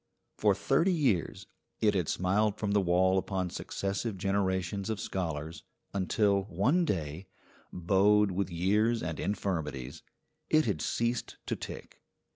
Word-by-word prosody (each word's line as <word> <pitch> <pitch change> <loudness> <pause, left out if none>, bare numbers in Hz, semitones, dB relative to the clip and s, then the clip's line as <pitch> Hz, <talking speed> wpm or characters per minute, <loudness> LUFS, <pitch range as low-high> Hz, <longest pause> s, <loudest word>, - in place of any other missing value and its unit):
For - - +3
thirty 185 +3 +2
years 135 - 0 0.3
it 105 -2 +3
had 90 -5 0
smiled 100 +3 +1
from 105 -2 -2
the 100 0 +3
wall 95 +1 +3
upon 95 -2 -3
successive 100 +2 -3
generations 95 0 -1
of 110 -2 -2
scholars, 80 -4 -4 0.3
until, 100 +1 +1
one 110 - +2
day, 85 - -3 0.4
bowed 100 +3 +3
with 95 0 -1
years 105 +7 +1
and 80 -2 -4
infirmities, 75 -10 -3 0.5
it 155 0 +4
had 100 -8 -1
ceased 115 0 -1
to - - -1
tick. - - -9
95 Hz, 130 wpm, -30 LUFS, 90-105 Hz, 0.5 s, it